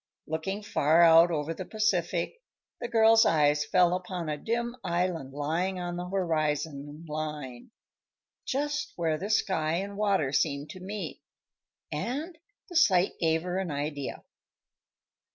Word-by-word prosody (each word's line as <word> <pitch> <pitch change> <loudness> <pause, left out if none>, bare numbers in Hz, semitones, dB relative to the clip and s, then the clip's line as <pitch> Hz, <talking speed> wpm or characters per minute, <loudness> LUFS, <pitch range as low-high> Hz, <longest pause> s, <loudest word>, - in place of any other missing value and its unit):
Looking 190 +6 -3
far 160 -3 +3
out 165 +1 +7
over 160 -1 -2
the 185 - -6
Pacific, 190 - -1 0.4
the 240 - -3
girl's 225 -1 +6
eyes 150 -2 +3
fell 180 +2 +3
upon 180 -2 -4
a 150 - -1
dim 235 +4 -2
island 170 -5 -1
lying 165 +7 -1
on 175 0 -4
the 180 +1 -5
horizon 155 -4 -2
line 150 -5 -5 0.7
just 295 +2 -2
where 160 -3 0
the 200 - -4
sky 160 -7 +1
and 200 +3 -3
water 200 -9 +1
seemed 145 0 0
to 185 - -10
meet 200 +3 -6 0.7
and 300 +9 -3 0.3
the 355 - -11
sight 190 - +4
gave 160 -1 +2
her 180 +1 -2
an 190 -3 -3
idea. 145 -1 -4
175 Hz, 135 wpm, -28 LUFS, 155-200 Hz, 0.7 s, out